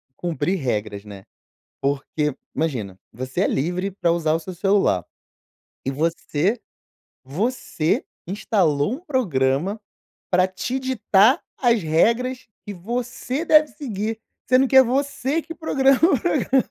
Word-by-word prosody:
cumprir 175 +1 -1
regras 105 - -3
né. 100 -2 -11 0.5
Porque, 140 +1 -1 0.2
imagina, 115 - -2
você 130 +2 -3
é - - +3
livre 180 +7 -1
pra 175 -3 0
usar 160 -2 +1
o 165 - +1
seu 185 +3 -8
celular. 195 - +2 0.8
E 135 - -1
você 165 - -1 0.6
você 165 - -1 0.2
instalou 190 - +1
um 275 - -5
programa 180 - 0 0.5
para 185 0 +4
te 245 +8 -3
ditar 250 - +3 0.2
as 235 -5 +3
regras 235 +11 +1 0.2
que 205 - -6
você 245 - -4
deve 305 -2 +5
seguir, 225 -6 -4 0.3
sendo 255 +1 +4
que 265 - +2
é 265 - +11
você 275 +4 -1
que 330 - -8
programa 270 -5 +2
o 325 - +3
programa. 255 +9 +1
195 Hz, 130 wpm, -22 LUFS, 150-255 Hz, 0.8 s, é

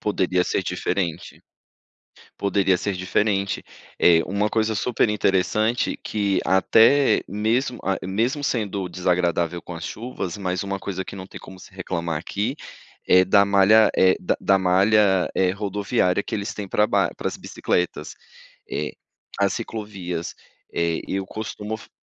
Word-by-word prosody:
Poderia 90 -3 +1
ser - - -1
diferente, 85 -5 -3 0.9
poderia 100 -2 +1
ser 100 - -2
diferente. 95 +1 -1 0.3
É 85 -1 +5
uma 100 +2 0
coisa 110 0 0
super 120 +2 +1
interessante 105 +3 +1
que 100 -2 0
até 115 +8 +4
mesmo 115 +6 -1
a 95 - 0
mesmo 120 +9 -1
sendo 100 -7 -2
desagradável 90 -1 0
com 90 - -9
as 80 - -7
chuvas, 110 -6 -5
mas 90 -1 -2
uma 100 0 -3
coisa 95 -1 -4
que 100 - -9
não 95 -1 -8
tem - - -11
como 95 - -12
se 95 - -15
reclamar 85 -3 -3
aqui 105 +8 -2 0.5
é 90 0 +6
da 100 +1 +5
malha, 100 +2 +5
eh, 95 0 +5
da - - 0
da 100 - +3
malha, 95 +1 +3
eh, 95 -1 +2
rodoviária 100 -1 0
que - - -10
eles 100 0 -3
têm 100 -2 -6
pras 105 - +2
bi - - -15 0.2
paras - - -3
as - - -7
bicicletas, 90 -1 -2 0.6
eh, 75 - -3 0.5
as 100 - +2
ciclovias, 100 -7 -5 0.4
eh, 85 -1 0
eu 95 0 -2
costumo 110 +1 -5
f 110 - -15
100 Hz, 150 wpm, -23 LUFS, 90-105 Hz, 0.9 s, é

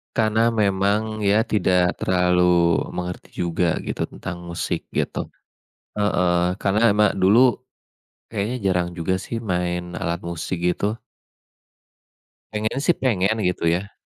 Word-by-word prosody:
Karena 110 +1 +2 0.2
memang, 100 +3 +1
ya, 105 +3 +4
tidak 90 -4 +1
terlalu 90 -2 +3 0.2
mengerti 90 0 -6
juga 85 -1 0
gitu - - -3
tentang 85 0 -8
musik 85 0 -3
gitu. - - -2 0.7
Heeh, 90 -3 +2
karena 100 +2 +1
emang 105 -1 +2
dulu 110 +6 +4 0.6
kayaknya 110 +3 -3
jarang 90 -2 +1
juga, 90 +3 0
sih, 115 +5 -4
main 90 -4 -2
alat 85 +1 -2
musik 85 +1 -4
gitu. 105 +5 0 1.5
Pengennya, 110 +4 -2
sih, 175 - +3
pengen 110 -4 +1
gitu, 90 -1 -1
ya. 95 +4 -2
95 Hz, 120 wpm, -22 LUFS, 90-105 Hz, 1.5 s, ya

